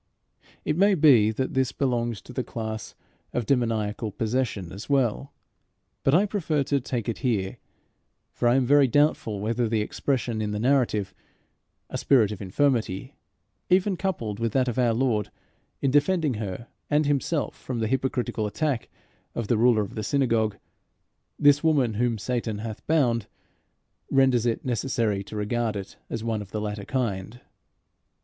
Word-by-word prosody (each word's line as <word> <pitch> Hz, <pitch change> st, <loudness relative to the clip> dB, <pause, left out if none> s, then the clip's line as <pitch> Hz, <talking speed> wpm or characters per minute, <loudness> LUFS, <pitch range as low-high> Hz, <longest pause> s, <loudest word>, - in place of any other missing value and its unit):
It 150 Hz, -, +1 dB
may 200 Hz, +1 st, +5 dB
be 135 Hz, -, +6 dB
that 130 Hz, +4 st, -2 dB
this 130 Hz, 0 st, +1 dB
belongs 120 Hz, -5 st, -1 dB
to 125 Hz, -, -11 dB
the 130 Hz, -, -2 dB
class 110 Hz, -2 st, -5 dB, 0.4 s
of 120 Hz, -, -1 dB
demoniacal 110 Hz, -4 st, 0 dB
possession 110 Hz, -5 st, -2 dB
as 100 Hz, +7 st, -9 dB
well, 135 Hz, -1 st, +1 dB, 0.7 s
but 135 Hz, -, +4 dB
I 195 Hz, +4 st, +5 dB
prefer 165 Hz, -8 st, 0 dB
to 140 Hz, +1 st, +1 dB
take 120 Hz, -3 st, -3 dB
it 115 Hz, -, -2 dB
here; 100 Hz, -7 st, -1 dB, 0.7 s
for 120 Hz, -, 0 dB
I 120 Hz, -, +5 dB
am 135 Hz, -1 st, +3 dB
very 140 Hz, +1 st, +5 dB
doubtful 130 Hz, -6 st, +2 dB
whether 115 Hz, +2 st, 0 dB
the 110 Hz, -1 st, +1 dB
expression 120 Hz, 0 st, -1 dB
in 105 Hz, -, -1 dB
the 105 Hz, -, -2 dB
narrative 120 Hz, -5 st, +1 dB, 0.7 s
"a -, -, -4 dB
spirit 115 Hz, -7 st, +4 dB
of 105 Hz, -, -6 dB
infirmity," 115 Hz, +2 st, 0 dB, 0.6 s
even 190 Hz, +2 st, +3 dB
coupled 120 Hz, -, -3 dB
with 115 Hz, -2 st, -1 dB
that 130 Hz, -1 st, +2 dB
of 125 Hz, 0 st, -1 dB
our 120 Hz, -2 st, +3 dB
Lord 115 Hz, -5 st, +1 dB, 0.5 s
in 135 Hz, -, +2 dB
defending 150 Hz, +1 st, +2 dB
her 105 Hz, 0 st, -5 dB, 0.2 s
and 150 Hz, +1 st, +3 dB
himself 145 Hz, +2 st, 0 dB
from 125 Hz, -, -5 dB
the 115 Hz, -, 0 dB
hypocritical 125 Hz, -3 st, -1 dB
attack 130 Hz, +4 st, -2 dB, 0.5 s
of 115 Hz, -3 st, -3 dB
the 120 Hz, -, +3 dB
ruler 115 Hz, -2 st, +4 dB
of 100 Hz, -, -8 dB
the 110 Hz, -, -4 dB
synagogue, 115 Hz, -3 st, +1 dB, 0.8 s
"this 145 Hz, +1 st, +5 dB
woman 140 Hz, -8 st, +3 dB
whom 115 Hz, +1 st, 0 dB
Satan 115 Hz, -1 st, -2 dB
hath 110 Hz, 0 st, -7 dB
bound," 120 Hz, -9 st, +2 dB, 0.8 s
renders 130 Hz, -3 st, +3 dB
it 115 Hz, -, -1 dB
necessary 115 Hz, -4 st, 0 dB
to 110 Hz, -, -9 dB
regard 110 Hz, +1 st, -1 dB
it 100 Hz, -1 st, -7 dB
as 115 Hz, -, -4 dB
one 110 Hz, -2 st, -1 dB
of 100 Hz, -, -9 dB
the 105 Hz, -, -3 dB
latter 105 Hz, -1 st, -4 dB
kind. 115 Hz, -4 st, -2 dB
120 Hz, 160 wpm, -26 LUFS, 110-135 Hz, 0.8 s, be